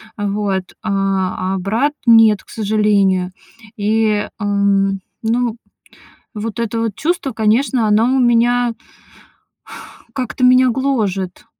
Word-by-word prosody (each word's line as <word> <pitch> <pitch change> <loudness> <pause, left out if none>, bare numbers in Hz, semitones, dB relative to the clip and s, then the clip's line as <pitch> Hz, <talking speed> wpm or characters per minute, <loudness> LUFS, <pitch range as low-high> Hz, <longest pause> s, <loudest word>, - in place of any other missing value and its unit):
А 205 -2 -3
вот. 200 -2 -1 0.2
А 195 -2 -1
а - - -2
брат- 230 +10 0
нет, 225 -3 +5
к - - -26
сожалению. 200 -4 +1 0.5
И, 215 0 +1
ам 200 -2 +1 0.2
ну, 235 +1 0 0.8
вот 220 +2 -5
это 230 0 -2
вот 225 -3 -2
чувство, 310 -4 -2
конечно, 225 +2 +1
оно 215 +2 +3
у - - +2
меня 240 0 +2 1.4
как-то 255 0 -4
меня 255 0 +5
гложет. 215 -8 -2
215 Hz, 115 wpm, -17 LUFS, 200-240 Hz, 1.4 s, нет